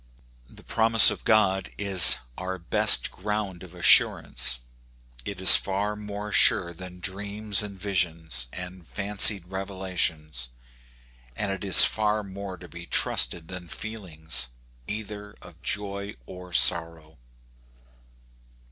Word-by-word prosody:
The -, -, -15 dB
promise 115 Hz, 0 st, +6 dB
of -, -, -9 dB
God 95 Hz, -4 st, 0 dB
is 95 Hz, -4 st, +5 dB, 0.2 s
our 95 Hz, 0 st, -7 dB
best 85 Hz, -1 st, +3 dB
ground 100 Hz, -2 st, -6 dB
of 90 Hz, -1 st, -14 dB
assurance; 85 Hz, -7 st, +2 dB, 0.7 s
it 100 Hz, -2 st, -7 dB
is 95 Hz, -, +10 dB
far 100 Hz, +2 st, -3 dB
more 105 Hz, 0 st, -9 dB
sure 85 Hz, -3 st, +2 dB
than 90 Hz, +1 st, -12 dB
dreams 100 Hz, +2 st, -3 dB
and 100 Hz, -2 st, -10 dB
visions, 85 Hz, -10 st, -3 dB
and 90 Hz, -2 st, -10 dB
fancied 100 Hz, -2 st, +2 dB
revelations; 90 Hz, -8 st, -4 dB, 0.9 s
and 100 Hz, +6 st, -4 dB
it 95 Hz, -1 st, -7 dB
is 95 Hz, -3 st, +8 dB
far 105 Hz, 0 st, -2 dB
more 100 Hz, -1 st, -10 dB
to 90 Hz, +1 st, -14 dB
be 85 Hz, 0 st, -13 dB
trusted 80 Hz, -2 st, 0 dB
than 90 Hz, -1 st, -10 dB
feelings, 80 Hz, -, -4 dB, 0.4 s
either 105 Hz, -1 st, -9 dB
of -, -, -17 dB
joy 100 Hz, 0 st, -5 dB
or 90 Hz, +2 st, -13 dB
sorrow. 85 Hz, -3 st, 0 dB
95 Hz, 120 wpm, -24 LUFS, 85-105 Hz, 0.9 s, is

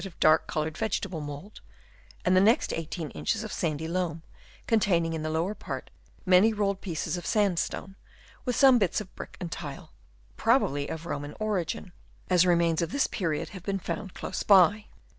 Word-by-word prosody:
149 190 Hz, -4 st, -8 dB
of -, -, -29 dB
dark 155 Hz, +1 st, +4 dB
coloured 155 Hz, 0 st, -2 dB
vegetable 195 Hz, -6 st, -2 dB
mould, 145 Hz, +8 st, -8 dB, 0.6 s
and 185 Hz, 0 st, +4 dB
the 185 Hz, -, +6 dB
next 225 Hz, +8 st, +3 dB
18 165 Hz, -1 st, -4 dB
inches 220 Hz, 0 st, -2 dB
of 215 Hz, -, -6 dB
sandy 160 Hz, -2 st, -2 dB
loam, 165 Hz, -2 st, -2 dB, 0.4 s
containing 180 Hz, -7 st, +2 dB
in 160 Hz, -, -3 dB
the 155 Hz, -, -2 dB
lower 165 Hz, +6 st, 0 dB
part -, -, -7 dB, 0.3 s
many 185 Hz, +4 st, +6 dB
rolled 200 Hz, -2 st, -1 dB
pieces 175 Hz, -1 st, -3 dB
of 175 Hz, -, -6 dB
saud 205 Hz, -6 st, +2 dB
stone, 195 Hz, 0 st, -4 dB, 0.5 s
with 250 Hz, -3 st, -1 dB
some 265 Hz, -3 st, +6 dB
bits 190 Hz, -2 st, +1 dB
of 205 Hz, -3 st, -9 dB
brick -, -, -9 dB
and 170 Hz, -3 st, -5 dB
tile, 155 Hz, +1 st, -7 dB, 0.5 s
probably 140 Hz, 0 st, +2 dB
of 160 Hz, 0 st, -6 dB
Roman 145 Hz, -2 st, -5 dB
origin, 200 Hz, -2 st, -2 dB, 0.4 s
as 180 Hz, 0 st, +5 dB
remains 170 Hz, -2 st, +3 dB
of 170 Hz, 0 st, -2 dB
this 280 Hz, -, +2 dB
period 165 Hz, -8 st, -2 dB
have 190 Hz, -, -9 dB
been 195 Hz, +2 st, -2 dB
found 195 Hz, +1 st, -5 dB
close 190 Hz, -, -4 dB
by. 205 Hz, +2 st, +5 dB
180 Hz, 180 wpm, -28 LUFS, 160-205 Hz, 0.6 s, the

